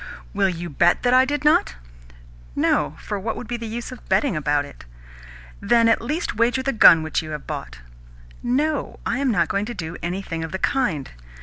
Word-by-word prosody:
"Will 200 -2 +2
you 175 -1 -5
bet 170 +3 +2
that 245 0 +3
I 255 +1 +6
did 290 +1 -3
not?" 300 - +3 0.8
"No; - - +1
for 205 - -4
what 220 +3 -3
would 245 - -7
be 240 - -3
the 230 -1 -5
use 235 +3 -5
of 255 - -12
betting 275 -10 +2
about 145 -1 0
it?" 140 - -13 0.8
"Then 230 -1 +3
at 225 - +3
least 300 +9 -3
wager 245 +3 +2
the 275 +1 0
gun 165 -7 +7
which 160 - -1
you 155 - -9
have 150 -2 -6
bought." - - -7 0.6
"No, 285 +4 -1
I 255 - -1
am 280 -1 +1
not 175 -8 +2
going 200 +4 -1
to 240 +1 -6
do 165 -2 -6
anything 175 -2 -4
of 160 - -6
the 190 - -2
kind." 190 - -1
215 Hz, 205 wpm, -22 LUFS, 165-250 Hz, 0.8 s, gun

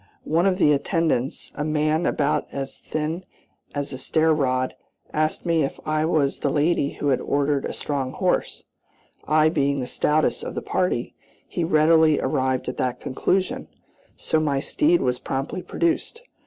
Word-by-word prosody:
One 170 +5 +2
of 185 -1 +2
the 150 -6 +4
attendants, 145 -2 0
a 145 - -3
man 155 +2 +1
about 145 0 0
as 135 -1 -5
thin 155 +4 -3 0.5
as 145 -1 -3
a 130 - -6
stair 160 +4 +2
rod, 130 -3 0 0.4
asked 155 +1 0
me 165 -2 +2
if 140 - -2
I 155 0 +1
was 150 -4 +1
the 145 - 0
lady 145 0 +1
who 145 - -2
had 130 - +2
ordered 140 0 0
a - - -4
strong 135 -3 -3
horse; 185 +1 -1 0.6
I 155 +1 +4
being 140 -3 +1
the 125 - -2
stoutest 150 +4 +1
of - - -5
the - - -2
party, - - -1 0.3
he 175 - -2
readily 160 -1 +4
arrived 130 -3 0
at 125 - -4
that 125 -1 -1
conclusion, 185 +8 -1 0.5
so 160 - 0
my 145 -3 +1
steed 315 - +2
was 125 0 0
promptly 135 +7 -3
produced. 335 - -1
150 Hz, 165 wpm, -24 LUFS, 140-160 Hz, 0.6 s, the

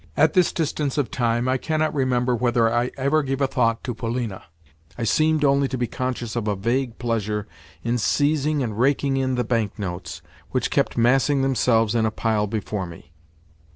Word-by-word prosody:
At - - +4
this 180 -4 +3
distance 150 -3 -2
of 145 -4 0
time 120 0 0
I 130 0 +1
cannot 155 +1 0
remember 125 -3 +1
whether 120 -1 +2
I 120 +1 +1
ever 140 +4 +2
gave 135 -1 -2
a 140 - +3
thought 115 -3 0
to 125 - -3
Polina; 115 -3 -4 0.5
I - - -3
seemed 155 +6 +2
only 140 0 +3
to 130 - -4
be 120 - 0
conscious 120 -1 -4
of 115 -3 -2
a 105 - +1
vague 120 +4 -1
pleasure 105 -4 -2 0.4
in 120 +1 0
seizing 145 +3 +1
and 110 -3 -4
raking 135 +1 +2
in 130 -1 0
the 125 - 0
bank 115 -3 -1
notes 95 -3 -6 0.3
which - - -1
kept - - 0
massing 135 +4 +3
themselves 115 -4 +2
in 115 -2 +2
a - - +1
pile 110 -1 0
before 105 -2 -3
me. 85 0 -13
125 Hz, 190 wpm, -23 LUFS, 115-135 Hz, 0.5 s, At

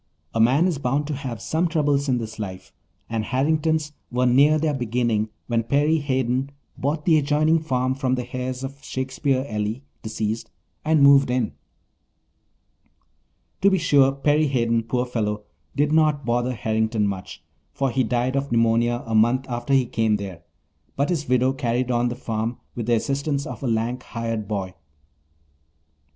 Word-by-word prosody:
A 115 - -1
man 130 +9 +4
is 170 -6 0
bound 140 +2 0
to 150 - -3
have 130 -5 -5
some 160 +9 0
troubles 145 -4 +1
in 125 - +2
this 110 -2 -6
life, 95 -3 -7 0.3
and 115 -1 -2
Harrington's 150 +4 0 0.2
were 125 +1 +1
near 140 +5 +5
their 155 -1 0
beginning 120 -4 0 0.2
when 115 -1 +1
Perry 145 +7 +2
Hayden 130 -1 0 0.3
bought 150 +3 -2
the 160 -3 +5
adjoining 150 +3 +2
farm 130 -4 0
from 130 -1 0
the 125 0 -6
heirs 130 0 -3
of 140 +2 -7
Shakespeare 130 0 -1
Ely, 105 +2 -3 0.2
deceased, 110 0 -3 0.3
and 155 -2 +3
moved 140 -1 +6
in. 125 -3 0 2.1
To 200 - +6
be 190 - +2
sure, 145 -5 +4
Perry 145 +3 +2
Hayden, 115 -4 +1
poor 125 +2 -1
fellow, 105 -4 -2 0.3
did 145 +1 +2
not 155 -3 +3
bother 120 +1 0
Harrington 110 -1 0
much, 95 -2 -5 0.3
for 135 -2 -1
he 130 +2 +1
died 125 +2 0
of 140 -1 -1
pneumonia 115 +1 +2
a 115 - -4
month 120 +4 +3
after 120 +1 -4
he 130 -2 +3
came 110 -2 +1
there, 95 -5 -6 0.5
but 140 +1 0
his 155 -7 -2
widow 130 +1 +3
carried 125 -2 -1
on 120 0 +1
the 120 - -4
farm 115 -1 -3 0.2
with 115 -2 -5
the 120 - +4
assistance 140 +4 -1
of 125 -3 -7
a 135 - -2
lank 115 +2 -1
hired 115 -3 -4
boy. 95 -3 -3
125 Hz, 165 wpm, -23 LUFS, 115-140 Hz, 2.1 s, moved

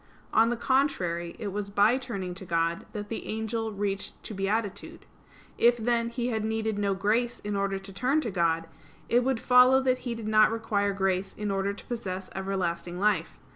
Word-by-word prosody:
On 225 +1 +5
the 240 - -1
contrary, 185 -11 0
It 210 - -4
was 200 +1 -4
by 205 +5 +4
turning 200 -8 -4
to 190 - -9
God 170 -1 -1
that 205 -1 -6
the 225 - -4
angel 220 0 -2
reached 200 -1 -3
to - - -6
beatitude. 200 +1 -3 0.5
If, 240 +1 +5
then, 235 0 +1
he 240 +1 -2
had 220 -3 -1
needed 220 -1 -1
no 200 -1 +1
grace 225 +5 0
in 205 0 -3
order 195 0 0
to 195 0 -9
turn 255 +9 +1
to 235 -7 -3
God, 165 -2 +1 0.4
it 240 +1 +4
would 260 -2 0
follow 250 +2 +6
that 255 -1 +2
he 240 -2 -4
did 225 -2 -6
not 215 0 +5
require 215 -3 0
grace 190 -1 -1
in 210 -1 -3
order 195 0 0
to 200 - -10
possess 190 -6 -5
everlasting 180 -2 -2
life. 210 +1 +1
210 Hz, 190 wpm, -28 LUFS, 195-235 Hz, 0.5 s, follow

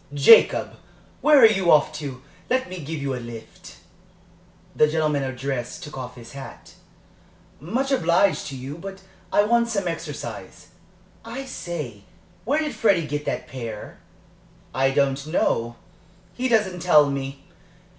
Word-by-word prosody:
"Jacob, 145 +11 +6 0.4
where 300 0 +6
are 250 - +9
you 195 -5 +3
off 150 0 +5
to? 140 -4 -7 0.3
Let 260 +1 +1
me 185 0 -7
give 160 +1 -5
you 140 -1 -2
a 125 - -4
lift?" 115 -1 -11 1.0
The 150 - +5
gentleman 150 -2 0
addressed 130 +1 -4
took 150 -2 -9
off 125 -2 -7
his 120 -2 -12
hat. 135 -1 -11 0.9
"Much 240 - -2
obliged 175 - +2
to 140 - -6
you, 135 +5 -7
but 195 +1 -9 0.3
I 205 - +4
want 235 +2 +2
some 200 -5 -1
exercise. 165 -3 -6 0.5
I 270 - -6
say, 155 - -6 0.4
where 290 +7 +1
did 305 -1 -3
Freddie 195 -8 +2
get 150 0 -4
that - - -3
pair?" 115 -5 -7 0.7
"I 135 0 +2
don't 140 0 0
know, 120 -7 0 0.6
he 255 +1 -1
doesn't 210 -6 +2
tell 155 -4 +5
me. 135 0 -5
150 Hz, 145 wpm, -23 LUFS, 135-195 Hz, 1.0 s, are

